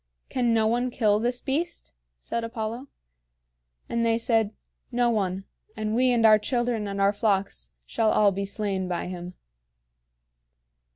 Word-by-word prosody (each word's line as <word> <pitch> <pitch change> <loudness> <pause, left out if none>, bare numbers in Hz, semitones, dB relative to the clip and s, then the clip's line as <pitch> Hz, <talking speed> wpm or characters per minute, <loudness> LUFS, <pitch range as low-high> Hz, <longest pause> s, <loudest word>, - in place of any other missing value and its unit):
"Can 245 -2 +1
no 225 -1 +3
one 240 +3 +1
kill 210 -4 +2
this 245 +2 -1
beast?" 325 +6 -3 0.3
said 235 - -3
Apollo. 230 +3 -4 1.0
And 235 0 -1
they 230 0 +3
said, 225 -3 +1 0.4
"No 240 0 +2
one; 195 -3 -1 0.3
and 215 0 -2
we 255 +2 +3
and 235 -2 +3
our 215 -1 +7
children 240 -2 -1
and 200 0 -4
our 200 +1 +3
flocks 200 - -1 0.2
shall 220 - +1
all 210 -2 +4
be 195 +1 -3
slain 195 -2 -2
by 175 -1 -2
him." 180 0 -7
220 Hz, 150 wpm, -26 LUFS, 200-240 Hz, 1.0 s, our